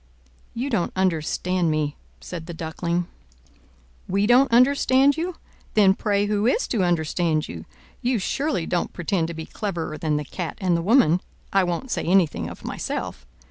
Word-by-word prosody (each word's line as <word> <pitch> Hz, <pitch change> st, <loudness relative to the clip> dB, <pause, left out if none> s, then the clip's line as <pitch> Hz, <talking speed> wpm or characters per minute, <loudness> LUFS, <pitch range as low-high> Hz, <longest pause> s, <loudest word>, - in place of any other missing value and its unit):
"You 260 Hz, +4 st, -2 dB
don't 200 Hz, -7 st, 0 dB
understand 180 Hz, 0 st, 0 dB
me," 150 Hz, -1 st, 0 dB, 0.2 s
said 170 Hz, -3 st, -7 dB
the 170 Hz, -, -6 dB
Duckling. 170 Hz, +2 st, -2 dB, 1.0 s
"We 200 Hz, +2 st, +1 dB
don't 245 Hz, +4 st, +5 dB
understand 265 Hz, +2 st, +4 dB
you? 340 Hz, +2 st, -3 dB, 0.4 s
Then 200 Hz, -3 st, +6 dB
pray 205 Hz, 0 st, 0 dB
who 210 Hz, +1 st, +1 dB
is 450 Hz, -, +1 dB
to 215 Hz, -6 st, +1 dB
understand 165 Hz, -2 st, +1 dB
you? 85 Hz, -1 st, -8 dB, 0.4 s
You 245 Hz, 0 st, +1 dB
surely 275 Hz, -, -1 dB
don't 175 Hz, 0 st, -1 dB
pretend 175 Hz, -1 st, -1 dB
to 170 Hz, -, -6 dB
be 160 Hz, 0 st, -6 dB
cleverer 170 Hz, -7 st, -4 dB
than 155 Hz, -3 st, 0 dB
the 150 Hz, -, -3 dB
Cat 175 Hz, +3 st, -5 dB
and 185 Hz, -3 st, +2 dB
the 170 Hz, -, 0 dB
woman—I 195 Hz, -, +2 dB
won't 180 Hz, +9 st, -3 dB
say -, -, -1 dB
anything 165 Hz, -, +2 dB
of 85 Hz, -, -11 dB
myself. -, -, -4 dB
180 Hz, 160 wpm, -24 LUFS, 160-220 Hz, 1.0 s, Then